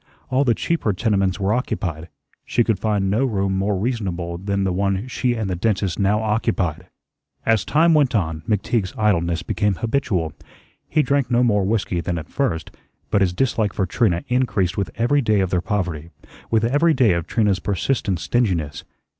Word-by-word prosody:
All 130 +2 +3
the 120 -4 +2
cheaper 165 -11 0
tenements 100 -1 0
were 100 +1 +1
occupied. 90 -9 -3 0.3
She 120 - +1
could 110 -4 0
find 105 -2 0
no 110 +6 +2
room 100 -6 0
more 100 +1 0
reasonable 90 -6 -3
than 100 +1 -1
the 95 -2 0
one 100 +4 -1
she 125 -1 -1
and 110 -3 -2
the 95 - -1
dentist 95 0 -1
now 105 +2 +2
occupied. 100 -6 -1 0.6
As 110 -4 +3
time 160 - +3
went 140 -5 +3
on, 80 -6 -1
McTeague's 105 -1 0
idleness 85 -5 +1
became 105 -1 0
habitual. 110 - -1 0.6
He 155 -1 +2
drank 140 -3 +1
no 120 0 +3
more 105 -5 +2
whiskey 100 -4 0
than 85 0 -2
at 80 - -7
first, 125 -13 -2 0.4
but 100 - +3
his 95 -2 +3
dislike 110 0 0
for 95 - 0
Trina 90 -2 +1
increased 125 -8 +1
with 100 -4 -2
every 130 +5 +2
day 110 -4 +2
of 95 -1 0
their 90 - +1
poverty, 90 -6 -3 0.4
with 110 -1 +2
every 150 +6 +3
day 120 -6 +4
of 85 -2 -2
Trina's 105 -5 +1
persistent 100 0 -1
stinginess. 90 -11 -1
105 Hz, 180 wpm, -21 LUFS, 90-120 Hz, 0.6 s, day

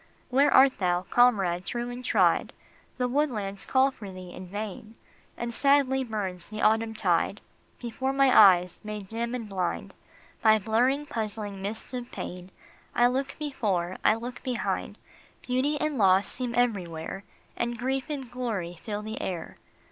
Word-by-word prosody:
Where 275 +3 +4
art 265 0 +6
thou, 180 -1 +1
comrade 195 -7 +3
true 240 +4 -3
and 245 +1 -7
tried? - - +2 0.4
The 250 - +1
woodlands 235 -8 -1
call 265 +1 +3
for 205 -6 -9
thee 185 -1 -9
in 185 - -9
vain, 215 +3 -6 0.4
And 235 0 -4
sadly 275 0 +3
burns 195 -7 -4
the 215 0 -6
autumn 220 +1 +2
tide - - +1 0.4
Before 255 +3 -2
my 270 -1 +4
eyes, 180 -4 +6
made 210 -2 -6
dim 235 +3 -3
and 230 -3 -5
blind 185 -3 -3 0.5
By 220 -1 +6
blurring, 245 +8 +1
puzzling 210 -5 -4
mists 215 +5 -5
of 245 -1 -5
pain. 180 +1 -7 0.5
I 240 - +5
look 260 +2 0
before, 200 - -2
I - - +5
look 240 +2 -7
behind; 250 -2 -2 0.5
Beauty 270 +4 0
and 305 -4 -1
loss 190 0 +5
seem 245 -2 -3
everywhere, 195 -7 -1 0.3
And 240 0 -2
grief 265 +3 -2
and 275 -4 -4
glory 205 -9 -3
fill 210 -1 -4
the 220 +1 -5
air. 175 -3 -5
225 Hz, 155 wpm, -27 LUFS, 195-255 Hz, 0.5 s, art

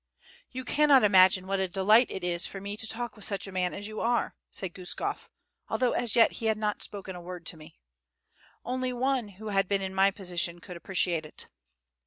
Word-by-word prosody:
"You 255 0 -6
cannot 285 -2 +5
imagine 185 -2 +6
what 195 0 -1
a 190 - 0
delight 205 +6 +4
it 190 - -6
is 175 -1 -1
for 195 - -7
me 200 +1 -5
to 220 +1 -3
talk 235 0 -4
with 210 - -3
such 200 -1 0
a 195 - -8
man 180 -1 0
as 205 +1 -6
you 215 0 -6
are," 235 +1 0
said 185 -3 -4
Guskof, 180 -2 -4 0.4
although 255 -1 +1
as 240 -2 -1
yet 230 - +6
he 225 - -4
had 220 -1 +2
not 210 -1 -2
spoken 195 -2 -6
a 175 - -8
word 175 -1 -8
to 160 - -3
me. 155 +1 -15 0.9
"Only 255 0 -2
one 255 -1 0
who 205 +2 -9
had 195 -1 +1
been 195 0 0
in 190 0 -4
my 195 +1 +4
position 180 -3 -1
could 180 +1 -10
appreciate 175 -2 0
it." 155 - -8
195 Hz, 215 wpm, -28 LUFS, 185-225 Hz, 0.9 s, imagine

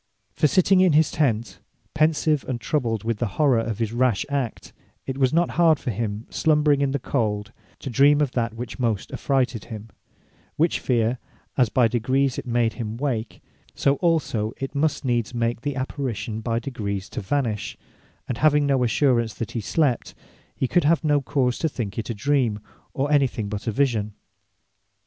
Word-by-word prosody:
For 150 - +3
sitting 185 +5 +4
in 185 -4 +4
his 155 0 +4
tent, 120 -7 0 0.3
pensive 155 -1 +2
and 125 -2 -2
troubled 115 -5 -1
with 115 -1 -2
the 120 - 0
horrour 140 -6 +4
of 115 -2 -2
his 115 -1 -2
rash 120 -3 +1
act, 135 -5 -3 0.3
it 135 - -3
was 130 -2 +3
not 170 +1 +2
hard 160 -3 +5
for 130 - -3
him, 110 +1 -3
slumbering 150 -2 +3
in 140 - +2
the 140 - 0
cold, 105 -6 -2 0.3
to - - -7
dream 145 +4 +5
of 145 -4 +1
that 115 -3 -2
which 120 +3 -7
most 115 -5 -1
affrighted 130 -6 -1
him; 110 -1 -8 0.7
which 165 +2 +2
feare, 120 0 0 0.4
as 125 -5 +3
by 125 0 +3
degrees 130 +3 0
it - - -8
made 120 -1 +1
him 115 -2 -5
wake; 120 -5 -3 0.3
so 140 0 +2
also 130 -11 0
it 135 0 -5
must 150 0 0
needs 120 -2 0
make 115 0 -1
the 145 -1 -3
Apparition 130 -4 -3
by 115 0 -1
degrees 105 -6 -4
to - - -5
vanish: 110 -1 -2 0.5
And 120 - -3
having 150 -1 +4
no 135 -3 +2
assurance 120 -2 +2
that 115 - -5
he 115 - -3
slept, 135 +2 0 0.4
he 130 - -1
could 175 +6 +2
have 160 +3 +3
no 145 -2 +2
cause 130 -2 0
to 160 - +1
think 115 -7 -4
it 110 - -5
a 115 - -2
Dream, 125 -3 +1 0.4
or 140 +2 0
any 140 -2 +4
thing 110 -4 -5
but 105 +2 -5
a - - +2
Vision. 110 -5 0
125 Hz, 185 wpm, -24 LUFS, 115-145 Hz, 0.7 s, hard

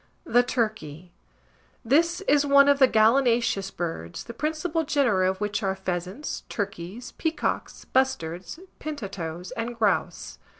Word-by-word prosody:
THE 245 -6 +4
TURKEY. 210 - -3 0.7
This 335 - +3
is 295 -6 +3
one 280 0 +6
of 285 -1 +4
the 265 - +7
gallinaceous 230 -3 +3
birds, 160 - -5
the 235 - -9
principal 315 +4 -1
genera 235 -11 +2
of 190 - -3
which 205 0 -1
are 195 -2 0
Pheasants, 190 - -4
Turkeys, 200 +3 -5
Peacocks, 320 0 -2
Bustards, 190 - -1 0.2
Pintatoes, 185 - -6
and 235 +1 -4
Grouse. 215 -3 -1
225 Hz, 125 wpm, -26 LUFS, 185-280 Hz, 0.7 s, the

